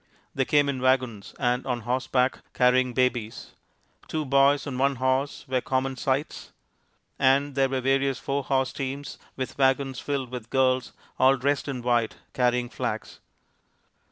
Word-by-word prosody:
They 135 - 0
came 145 +1 +3
in 135 -2 -2
wagons 125 -5 0
and 125 -1 0
on 125 -2 -1
horseback, 125 +2 0 0.2
carrying 125 0 +3
babies; 125 -4 -1 0.6
two 155 -1 -2
boys 140 +1 +3
on 130 -3 -4
one 140 +1 +2
horse 130 +4 -1
were 130 -1 0
common 130 +1 -1
sights; 135 +3 -2 0.7
and 140 +1 +3
there 135 0 +2
were 130 -1 -1
various 135 0 +1
four 140 +4 -2
horse 135 -1 0
teams 140 0 -5 0.2
with 130 +1 -5
wagons 135 -1 +2
filled 135 -4 -3
with 125 -2 -7
girls 130 -1 +1 0.3
all 135 +1 +5
dressed 140 +3 0
in 130 -4 -4
white, 120 -2 +1 0.2
carrying 125 -1 +1
flags. - - -5
130 Hz, 150 wpm, -26 LUFS, 125-135 Hz, 0.7 s, all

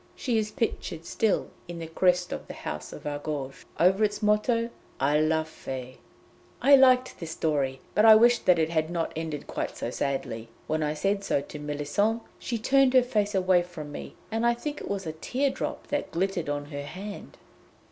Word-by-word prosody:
She 235 -4 0
is 215 -1 -2
pictured 175 -7 -3
still 220 +2 0 0.2
in 175 0 -6
the 165 - -5
crest 180 +2 +2
of - - -5
the - - -8
house 75 0 -6
of 145 - -10
Argouges, 145 -2 -4
over 190 +5 +4
its 210 +1 0
motto, 230 +3 +2 0.3
'A 145 +3 +3
la 160 0 +2
Fe!'" 130 -5 -8 0.6
I 280 +1 +7
liked 255 -1 +4
this 165 - -6
story, 140 -5 -1
but 210 - +3
I 220 -1 +10
wished 240 +2 +4
that 180 -2 +6
it 160 0 +1
had 160 -1 +1
not 170 -1 -2
ended 160 -2 -4
quite - - -4
so - - -3
sadly. 115 -5 -3 0.2
When 155 0 -1
I 150 0 0
said 195 +5 0
so 145 - +1
to 150 - -9
Méllisande 150 +10 0 0.2
she 235 - -3
turned 265 +3 +3
her 255 - +7
face 210 -4 0
away 185 -1 +4
from 170 -4 -8
me, - - -8 0.2
and 225 +1 -1
I 235 0 +4
think 295 +5 -5
it - - -6
was 195 -2 -2
a 160 - -2
tear 260 - -1
drop 285 +2 -4
that 290 - -1
glittered 175 -3 -1
on 145 +1 -3
her 145 0 -4
hand. 195 +8 -8
180 Hz, 200 wpm, -27 LUFS, 150-220 Hz, 0.6 s, I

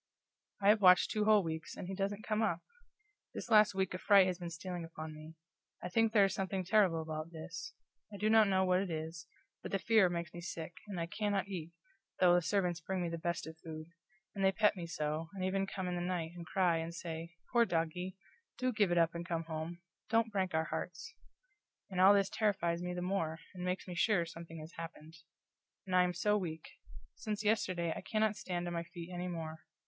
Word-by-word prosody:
I 200 - +6
have 210 0 +5
watched 185 -1 +7
two 215 -1 +1
whole 210 -2 +6
weeks, 160 -1 -5
and - - -6
he 195 - -4
doesn't 200 +2 -2
come 215 0 0
up! 175 -6 +1 0.7
This 235 - -6
last 210 -2 +6
week 190 -1 0
a 185 - -4
fright 200 -2 +6
has 185 -1 -2
been 175 -1 -5
stealing 175 +1 -5
upon 160 -1 -7
me. 155 +1 -11 0.5
I 180 - -3
think 225 +4 +3
there 205 -3 +6
is 195 - -1
something 190 -1 -2
terrible 185 -5 +3
about 155 0 -5
this. 165 +7 -7 0.4
I 205 - -7
do 210 - 0
not 220 -1 +6
know 190 -1 +3
what 185 0 +3
it 195 -1 -2
is, 160 0 -5 0.3
but - - -6
the 195 - +2
fear 215 -2 +4
makes 170 0 -4
me 175 - -7
sick, 170 -1 -6
and 195 -4 -4
I 165 - 0
cannot 205 +2 -1
eat, 170 -3 -5 0.5
though 180 -1 +6
the 175 - +4
servants 180 -2 0
bring 185 +1 -2
me 170 - -1
the 165 0 -4
best 170 0 -2
of 160 0 -10
food; 155 -1 -8 0.4
and 195 - -2
they 190 - +5
pet 210 +1 +3
me 175 -3 -5
so, 155 0 -2
and 185 -1 -2
even 195 +1 0
come 190 -1 -4
in 180 - -2
the 175 - -2
night, 175 -2 -2
and 170 -1 -8
cry, 180 -2 +2
and 165 +1 -4
say, 165 0 -6 0.2
"Poor 235 -1 +6
doggie 180 0 -2 0.4
do 255 0 0
give 205 -4 +2
it 175 - +2
up 165 -1 +4
and 170 0 -4
come 165 -1 -2
home; 165 +2 -5 0.3
don't 225 0 +2
break 190 -4 0
our 160 0 +2
hearts!" 180 - -5 0.8
and 185 -1 0
all 195 +2 +8
this 195 -1 +3
terrifies 175 -6 +1
me 180 0 -3
the 180 - -3
more, 180 -4 -1 0.2
and 180 -1 -6
makes 180 +1 -2
me 180 - -5
sure 175 0 +2
something 165 0 -9
has 155 +2 -9
happened. 165 -1 -8 0.7
And 185 -1 -1
I 180 - +7
am 180 0 +1
so 210 +4 +2
weak; 160 -4 -5 0.5
since 215 -1 -4
yesterday 185 -6 +1
I - - -5
cannot 215 -1 +1
stand 180 -4 -3
on 175 - -3
my 170 - -1
feet 170 0 -9
anymore. 170 -3 -4
180 Hz, 225 wpm, -34 LUFS, 165-195 Hz, 0.8 s, all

